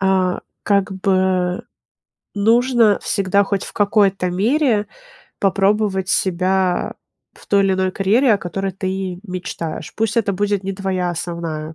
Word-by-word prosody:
А, 190 Hz, -2 st, +1 dB, 0.2 s
как 200 Hz, -1 st, +1 dB
бы, 185 Hz, -1 st, 0 dB, 0.7 s
нужно 230 Hz, +1 st, +3 dB
всегда 200 Hz, 0 st, +1 dB
хоть 195 Hz, -1 st, -2 dB
в -, -, -9 dB
какой-то 200 Hz, -3 st, +2 dB
мере 220 Hz, -, +1 dB, 0.5 s
попробовать 195 Hz, -1 st, +1 dB
себя 185 Hz, 0 st, +1 dB, 0.4 s
в -, -, -18 dB
той 200 Hz, -1 st, +3 dB
или 195 Hz, -, +2 dB
иной 185 Hz, 0 st, 0 dB
карьере, 220 Hz, +7 st, +3 dB
о -, -, -1 dB
которой 195 Hz, +1 st, -4 dB
ты 190 Hz, -1 st, -3 dB
мечтаешь. 175 Hz, -4 st, -5 dB
Пусть 220 Hz, 0 st, -1 dB
это 200 Hz, -3 st, +2 dB
будет 205 Hz, 0 st, -1 dB
не 195 Hz, -, -2 dB
твоя 185 Hz, -2 st, -2 dB
основная 165 Hz, -2 st, -5 dB
195 Hz, 135 wpm, -19 LUFS, 185-205 Hz, 0.7 s, нужно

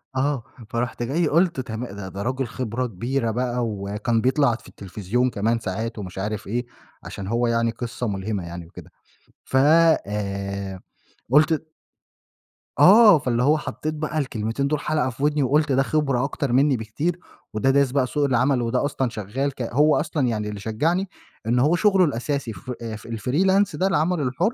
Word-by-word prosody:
آه، 135 Hz, -1 st, 0 dB, 0.3 s
فرُحت 120 Hz, -1 st, -2 dB
جاي 155 Hz, +8 st, 0 dB
قُلت 170 Hz, -2 st, +2 dB
تما 120 Hz, -2 st, -5 dB
ده 100 Hz, -1 st, -7 dB
ده 95 Hz, +2 st, -6 dB
رجُل 130 Hz, +2 st, -2 dB
خِبرة 125 Hz, 0 st, -3 dB
كبيرة 115 Hz, +3 st, -2 dB
بقى، 125 Hz, +1 st, -1 dB
وكان 105 Hz, +2 st, -1 dB
بيطلع 130 Hz, -2 st, +2 dB
في 115 Hz, -, -14 dB
التلفزيون 105 Hz, +6 st, -2 dB
كمان 115 Hz, +1 st, 0 dB
ساعات 110 Hz, +3 st, -4 dB
ومش 95 Hz, -1 st, -8 dB
عارف 105 Hz, +2 st, -3 dB
إيه 120 Hz, +4 st, -2 dB, 0.4 s
علشان 95 Hz, -, -7 dB
هو 120 Hz, +2 st, +1 dB
يعني 115 Hz, 0 st, +1 dB
قصّة 120 Hz, 0 st, -4 dB
مُلهمة 100 Hz, -1 st, -3 dB
يعني 85 Hz, 0 st, -7 dB
وكده، -, -, -13 dB, 0.5 s
ف 130 Hz, -, -2 dB, 0.5 s
آآ، 100 Hz, -2 st, -4 dB, 0.5 s
قُلت 155 Hz, +2 st, +4 dB, 1.1 s
آه، 210 Hz, -4 st, +8 dB
فاللي 125 Hz, -2 st, 0 dB
هو 150 Hz, +3 st, +4 dB
حطّيت 155 Hz, +1 st, -4 dB
بقى 155 Hz, 0 st, -3 dB
الكلمتين 125 Hz, -1 st, -1 dB
دول 150 Hz, 0 st, 0 dB
حلقة 150 Hz, -4 st, 0 dB
في 130 Hz, +3 st, -7 dB
ودني، 150 Hz, -1 st, +2 dB
وقُلت 150 Hz, +2 st, +2 dB
ده 135 Hz, +1 st, +3 dB
خبرة 140 Hz, -4 st, 0 dB
أكتر 140 Hz, -2 st, -2 dB
منّي 135 Hz, +1 st, +3 dB
بكتير 145 Hz, +11 st, -3 dB, 0.3 s
وده 110 Hz, +5 st, +1 dB
دارس 140 Hz, -1 st, +3 dB
بقى 130 Hz, -2 st, +1 dB
سوق 145 Hz, +1 st, 0 dB
العمل 130 Hz, 0 st, +2 dB
وده 120 Hz, +3 st, 0 dB
أصلًا 135 Hz, -3 st, -1 dB
شغّال 115 Hz, +7 st, -3 dB
ك -, -, -7 dB
هو 145 Hz, +6 st, +3 dB
أصلًا 150 Hz, -4 st, -1 dB
يعني 105 Hz, -3 st, -2 dB
اللي 105 Hz, -1 st, -6 dB
شجعني 165 Hz, -, -1 dB, 0.4 s
إن 120 Hz, +2 st, +2 dB
هو 150 Hz, +7 st, +3 dB
شغله 195 Hz, -1 st, +4 dB
الأساسي 135 Hz, -3 st, -2 dB
ف 125 Hz, +7 st, -8 dB, 0.4 s
الfreelance 185 Hz, -, +1 dB
ده 190 Hz, -, +2 dB
العمل 165 Hz, -1 st, +1 dB
الحر 165 Hz, -, 0 dB
125 Hz, 170 wpm, -23 LUFS, 110-145 Hz, 1.1 s, آه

